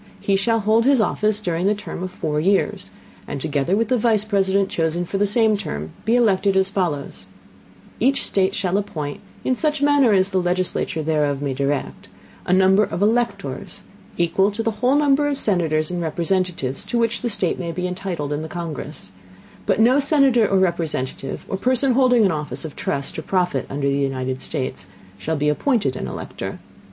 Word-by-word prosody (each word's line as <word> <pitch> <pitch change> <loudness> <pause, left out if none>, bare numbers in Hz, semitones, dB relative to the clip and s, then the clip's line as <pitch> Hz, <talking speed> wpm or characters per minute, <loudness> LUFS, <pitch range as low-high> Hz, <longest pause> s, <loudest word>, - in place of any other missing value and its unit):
He 200 - +1
shall 225 +3 +1
hold 220 +3 +3
his 275 -1 +4
Office 215 -1 +1
during 175 -1 -1
the 210 - +2
Term 205 -3 -7
of 185 - -3
four 150 -4 -2
Years, 195 +5 +1 0.4
and, 140 - -4
together 145 +4 0
with 225 +2 0
the 250 -2 +2
Vice 215 -2 +2
President 195 -2 +1
chosen 165 0 -1
for 195 +3 -3
the 205 - +3
same 220 +1 +3
Term, 80 - -5
be 230 - +3
elected, 200 -4 +3
as 190 0 +2
follows: 170 -8 -2 0.7
Each 270 +4 +2
State 195 0 +1
shall 190 0 0
appoint, 150 -8 -5 0.2
in 260 - +1
such 300 +3 0
Manner 285 -4 +4
as 190 0 +2
the 185 - +1
Legislature 175 -2 -1
thereof 150 -3 0
may 140 -1 -2
direct, 140 +2 -3 0.4
a - - 0
Number 190 +2 +5
of 185 -1 -2
Electors, 235 +3 -1 0.3
equal 185 +3 +2
to 215 +2 -3
the 225 - +1
whole 255 +2 +3
Number 290 0 +3
of 285 -1 -2
Senators 160 -5 +1
and 175 -1 -2
Representatives 170 -4 -1
to 240 - -2
which 230 0 0
the 240 - -1
State 190 -5 -1
may 170 -2 -3
be 180 +2 -3
entitled 180 -5 -3
in 145 - -2
the 160 - -5
Congress: 155 - -6 0.6
but - - +2
no 245 +5 +5
Senator 275 -6 +4
or 195 - +2
Representative, 165 -8 -2
or 190 - -3
Person 255 +5 +2
holding 250 -3 +4
an 190 - +3
Office 150 0 -4
of 155 - -8
Trust 140 0 -3
or - - -4
Profit 180 -2 -1
under 140 0 -2
the 140 0 +1
United 130 -1 -2
States, 130 - -4 0.3
shall 160 +11 -2
be 150 0 0
appointed 150 - +1
an - - -4
Elector. - - -6
190 Hz, 190 wpm, -21 LUFS, 155-220 Hz, 0.7 s, Number